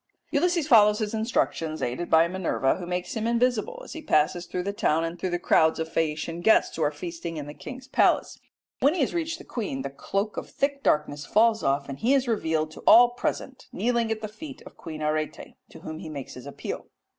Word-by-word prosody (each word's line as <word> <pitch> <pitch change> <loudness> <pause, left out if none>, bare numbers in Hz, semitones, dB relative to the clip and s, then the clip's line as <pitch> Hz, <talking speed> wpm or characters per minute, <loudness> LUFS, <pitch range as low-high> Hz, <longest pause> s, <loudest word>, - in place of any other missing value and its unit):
Ulysses 340 +1 +1
follows 210 -6 +6
his 215 -1 -2
instructions 220 -8 -1
aided 125 +8 -3
by 160 +1 +5
Minerva, 170 -7 0
who 175 - -7
makes 180 0 -3
him 225 0 -1
invisible 245 - 0
as - - -9
he 320 - -7
passes 175 - +1
through 180 0 -3
the 200 +2 -3
town 160 -5 +1
and 165 +1 -4
through 185 - -2
the 175 - 0
crowds 160 -2 +3
of 160 - -2
Phaeacian 165 +1 -1
guests 220 +5 +4
who 160 - -4
are 150 - +3
feasting 165 +2 -6
in 150 - -5
the 145 - -8
king's 255 +9 -9
palace. - - +2 0.4
When 285 +5 +3
he 345 - 0
has 265 - +1
reached 335 -1 -2
the - - -12
queen, 190 - -4
the 140 - -4
cloak 200 +9 -3
of - - -5
thick 280 0 -1
darkness 150 - 0
falls 220 +1 +3
off, 140 +1 0
and 140 0 -7
he 260 +5 +3
is 265 -2 +1
revealed 160 -8 0
to - - -11
all 240 +1 +9
present, 255 +2 -4
kneeling 235 +3 0
at 220 -1 -2
the 215 - -3
feet 275 +6 -10
of - - -13
Queen 155 -1 -7
Arete, 155 0 -2 0.2
to - - -13
whom 160 0 -7
he - - -7
makes 140 -4 -7
his 125 +2 -10
appeal. 140 - -6
180 Hz, 225 wpm, -26 LUFS, 155-235 Hz, 0.4 s, all